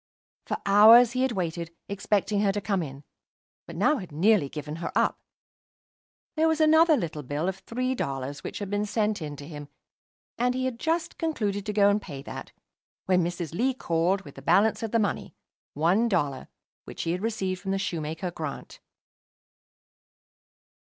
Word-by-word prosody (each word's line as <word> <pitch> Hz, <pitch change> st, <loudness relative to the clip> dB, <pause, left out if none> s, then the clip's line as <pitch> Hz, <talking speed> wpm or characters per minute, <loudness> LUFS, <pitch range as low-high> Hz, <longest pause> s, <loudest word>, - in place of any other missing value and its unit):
For -, -, -1 dB
hours 220 Hz, +4 st, +8 dB
he 255 Hz, +1 st, -1 dB
had 260 Hz, -2 st, +1 dB
waited, 170 Hz, -3 st, -3 dB
expecting 200 Hz, +1 st, 0 dB
her 200 Hz, -1 st, +3 dB
to 205 Hz, -, -1 dB
come 200 Hz, -2 st, -1 dB
in; 140 Hz, -2 st, -7 dB, 0.6 s
but -, -, -9 dB
now 300 Hz, -, +3 dB
had 185 Hz, -7 st, -8 dB
nearly 170 Hz, 0 st, +3 dB
given 150 Hz, +1 st, -6 dB
her 165 Hz, -, -4 dB
up. -, -, +2 dB, 1.2 s
There 320 Hz, +1 st, +3 dB
was 320 Hz, 0 st, +1 dB
another 315 Hz, 0 st, +5 dB
little 160 Hz, -, -4 dB
bill 145 Hz, +5 st, -3 dB
of 190 Hz, 0 st, -3 dB
three 255 Hz, +6 st, -2 dB
dollars 135 Hz, -, -4 dB
which -, -, -5 dB
had 200 Hz, -1 st, -5 dB
been 205 Hz, +1 st, 0 dB
sent 210 Hz, -2 st, 0 dB
in 150 Hz, -2 st, -5 dB
to 145 Hz, 0 st, -10 dB
him, 145 Hz, -3 st, -8 dB, 0.7 s
and 250 Hz, +1 st, +1 dB
he 260 Hz, 0 st, -1 dB
had 250 Hz, -3 st, -3 dB
just 325 Hz, +1 st, -1 dB
concluded 210 Hz, -11 st, -2 dB
to -, -, 0 dB
go 200 Hz, -1 st, +5 dB
and 205 Hz, +1 st, +2 dB
pay 140 Hz, -8 st, -8 dB
that, -, -, -8 dB, 0.5 s
when 180 Hz, -1 st, +3 dB
Mrs. 170 Hz, -2 st, -4 dB
Lee 255 Hz, +8 st, +1 dB
called 175 Hz, -1 st, 0 dB
with -, -, -12 dB
the -, -, -11 dB
balance 215 Hz, +2 st, +3 dB
of 225 Hz, -, -2 dB
the 230 Hz, -, +1 dB
money, 205 Hz, -3 st, -2 dB, 0.4 s
one 180 Hz, +10 st, +2 dB
dollar, 145 Hz, -9 st, -1 dB, 0.4 s
which -, -, -7 dB
she 165 Hz, -, -1 dB
had 180 Hz, +2 st, -2 dB
received 195 Hz, -5 st, -2 dB
from 195 Hz, -, -5 dB
the 195 Hz, -, +1 dB
shoemaker, 170 Hz, -1 st, -3 dB
Grant. 155 Hz, -4 st, -7 dB
195 Hz, 180 wpm, -27 LUFS, 165-225 Hz, 1.2 s, hours